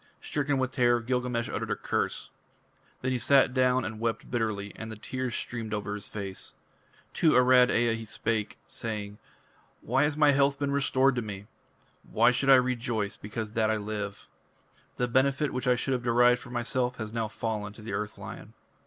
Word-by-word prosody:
Stricken 145 -1 -1
with 130 -1 0
terror, 120 -2 +3
Gilgamesh 125 -1 -1
uttered - - -4
a - - +1
curse. - - -2 0.7
Then 130 - 0
he 125 - 0
sat 135 0 +4
down 130 -1 +2
and 110 +1 -5
wept 115 0 -2
bitterly, 110 -4 -1
and 110 0 -7
the - - -6
tears 130 +3 -4
streamed 115 -3 -3
over 105 0 -3
his 105 -1 -6
face. 100 -2 -6 0.6
To 160 - +3
Arad 125 0 +6
Ea 120 -1 +2
he 115 0 -7
spake, 110 0 -2
saying: 105 -2 -5 0.6
"Why 135 - +1
has 150 0 +1
my 150 -1 +6
health 140 0 +3
been 140 -1 -1
restored 135 -1 +3
to - - +1
me? 100 -3 -7 0.6
Why - - +3
should 135 +2 0
I 135 - +10
rejoice 120 -5 0
because 105 +1 -6
that 110 -1 +1
I 110 - +2
live? 105 -1 -5 0.7
The 125 - +1
benefit 135 +3 +1
which 130 +1 -2
I 125 - +5
should 135 +2 -1
have 125 - -1
derived 120 +1 +4
for - - -11
myself 125 +1 -1
has 110 -1 -6
now 115 -1 -1
fallen 105 -1 -4
to 110 - -13
the 115 - -5
Earth 105 0 -3
Lion." - - -9
120 Hz, 190 wpm, -28 LUFS, 110-130 Hz, 0.7 s, I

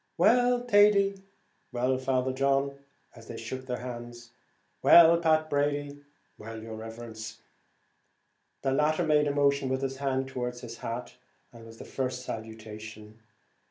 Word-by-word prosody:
"Well, 245 0 +4
Thady," 205 -3 +5
and 195 -1 -14 0.5
"Well, 130 +1 0
Father 130 0 0
John," 140 +1 +1 0.4
as 115 -1 -14
they 115 - -7
shook 130 +3 -6
hands; 120 -1 -6
and, - - -34 0.5
"Well, 170 -1 +8
Pat 155 -1 +2
Brady," 145 -1 0
and 145 0 -13 0.4
"Well, 110 +1 -8
yer 110 0 -8
riverence," 110 0 -8
as - - -22 1.3
the 135 - +1
latter 155 +5 +2
made 150 -1 +3
a - - +1
motion 140 -1 +2
with 130 +1 -1
his 135 0 -3
hand 135 -1 -1
towards 125 -2 -5
his 115 -1 -8
hat, 115 +2 -6 0.4
was 115 -1 -13
the - - -10
first 125 -1 -4
salutation. 110 -1 -8
130 Hz, 150 wpm, -28 LUFS, 115-145 Hz, 1.3 s, Well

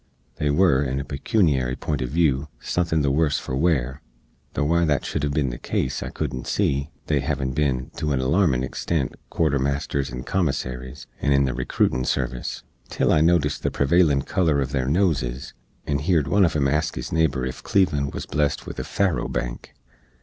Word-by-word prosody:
They 75 - 0
were, 75 -3 +4
in 65 0 -2
a 70 - -4
pekuniary 70 - +1
pint 75 -3 -3
uv 65 - -1
view, 75 -1 +1
suthin 85 -3 0
the 70 - +2
worse 75 0 +2
for 65 - -4
wear, 70 -3 0 0.5
tho' 75 - +1
why 85 +3 +2
that 75 -4 +1
shood - - -2
hev 70 0 -1
bin 70 -4 0
the - - -7
case 65 +1 -2
I - - -4
coodent 65 -1 -4
see 70 +2 0 0.2
(they 75 -2 +1
hevin 70 -1 -2
bin, 65 -3 0
to 75 - -1
an 65 - +1
alarmin 65 -1 +2
extent, 70 +1 -2 0.2
quarter 75 -4 +1
masters 70 0 -1
and 60 +1 -6
commissaries, 65 -8 -2 0.2
and 70 - +3
in 70 0 +4
the 65 - -1
recrootin 65 +1 0
service), 60 -1 -2 0.3
til - - +1
I - - +4
notist 80 -2 +2
the - - 0
prevailin 70 -1 +3
color 85 -5 +1
uv 70 -2 0
their 65 -2 -1
noses, 70 -7 0 0.3
and 70 0 -1
heerd 80 -3 +2
one 100 0 +4
uv 80 - 0
em 70 -2 +2
ask 75 +3 0
his - - -5
neighbor 75 -6 +1
ef 65 - -5
Cleveland 75 -8 +1
wuz - - -3
blest 75 -1 -1
with - - -7
a - - -2
faro 100 -4 0
bank! - - -5
70 Hz, 195 wpm, -24 LUFS, 65-80 Hz, 0.5 s, were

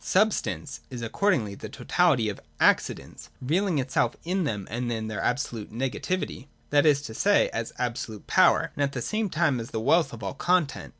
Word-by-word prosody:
j - - -12
Substance 195 -7 +1
is 125 -3 -6
accordingly 115 - +1
the - - -8
totality 155 -11 +2
of 105 - -3
the - - -18 0.2
Ac - - +6
cidents, - - -11
revealing 170 +6 +1
itself 130 -3 0
in 180 +1 0
them 105 -8 -3
as 120 +2 -2 0.3
their 110 -2 -4
absolute 120 -4 -2
nega 125 +5 -3
tivity, 145 -3 -3 0.2
(that 145 +1 +4
is 140 -2 +4
to 110 - -7
say, 205 - +3
as 115 0 -4
absolute 120 -3 -4
power,) - - +4
and - - -3
at 140 -1 +1
the 125 - -3
same 215 -1 -1
time 155 -6 +1
as 115 - -6
the 110 - -3
wealth 155 +8 +3
of 115 -3 -9
all 95 - -3
content. 175 -5 0
140 Hz, 200 wpm, -26 LUFS, 115-170 Hz, 0.3 s, Ac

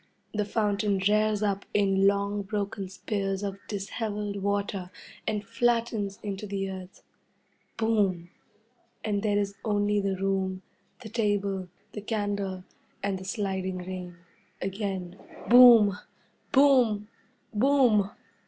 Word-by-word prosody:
The 210 -1 0
fountain 205 -1 0
rears 215 0 +2
up 200 -1 0
in 195 -1 +4
long 200 +1 +1
broken 200 -1 -3
spears 195 0 -3
of 200 -1 -4
dishevelled 205 0 -3
water 200 -2 -1 0.4
and 210 -2 -1
flattens 230 -3 0
into 205 0 -4
the 195 -1 -3
earth. 185 0 -10 0.7
Boom! 200 -6 +1 0.7
And 205 -2 0
there 205 -1 +1
is 200 -1 0
only 205 -1 +1
the 195 -1 0
room, 190 -1 -1 0.4
the 220 - -8
table, 200 -4 0 0.2
the 210 - -6
candle, 200 -3 -2 0.4
and 195 -1 -1
the 185 - -9
sliding 190 -2 -2
rain. 180 -1 -7 0.4
Again, 190 -2 -4 0.3
Boom! 230 -5 +8 0.5
Boom! 250 -7 +4 0.5
Boom! 235 -4 +4
200 Hz, 115 wpm, -28 LUFS, 195-215 Hz, 0.7 s, Boom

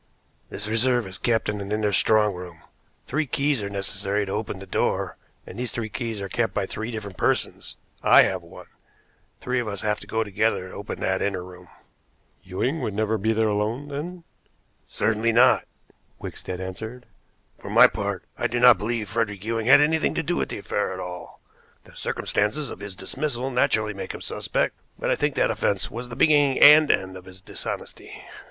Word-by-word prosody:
"This 105 +1 -5
reserve 120 +2 +2
is 95 0 -7
kept 115 -2 +1
in 105 -1 -2
an 100 +1 -6
inner 105 -1 +1
strong 105 +1 +3
room. 90 -2 -10 0.4
Three 150 +2 -1
keys 140 -2 +1
are 100 - -3
necessary 100 +1 -2
to 95 - -6
open 105 -1 -3
the 95 - -9
door, 95 - -1 0.3
and - - -9
these 125 -2 -3
three 110 -2 -4
keys 115 -2 -4
are 100 - -3
kept 115 +4 -1
by 100 - 0
three 110 +4 -5
different 105 -5 -6
persons. - - -1 0.3
I - - +7
have - - -1
one. - - -13 0.8
Three 125 0 0
of 120 - -3
us 100 -2 -4
have 105 0 0
to - - -12
go 110 0 0
together 105 -2 0
to - - -12
open 100 - -6
that 95 0 0
inner 95 -3 -1
room." 90 0 -13 0.7
"Ewing 110 - -2
would 105 - -3
never 110 +1 0
be 110 +3 +1
there 110 0 +2
alone, 110 +7 -1
then?" 165 +5 -6 0.6
"Certainly 115 +1 0
not," 125 +2 +5 0.5
Wickstead 90 -1 -7
answered. 110 +7 -7 0.5
"For - - -9
my - - +8
part, - - -1 0.2
I - - +1
do 120 - -2
not 125 -4 +7
believe 110 0 -2
Frederick 105 -3 -2
Ewing 115 0 -1
had 135 +2 +8
anything 160 +2 +2
to 165 - 0
do 175 +4 -1
with - - -1
the - - -4
affair 100 -1 -2
at 95 - -7
all. 90 -1 -8 0.4
The - - -18
circumstances 110 +7 -1
of - - -8
his 100 -2 -7
dismissal 130 +6 -3
naturally 110 -4 +1
make 100 - -6
him - - -9
suspect, - - -1 0.2
but - - -1
I - - +3
think - - -1
that - - +2
offense 100 -1 0
was 120 +2 -6
the 120 - -7
beginning 145 -3 +4
and 150 +1 +9
end 95 0 +1
of 95 -1 -10
his 95 0 -12
dishonesty." 95 - -7
110 Hz, 195 wpm, -24 LUFS, 100-120 Hz, 0.8 s, and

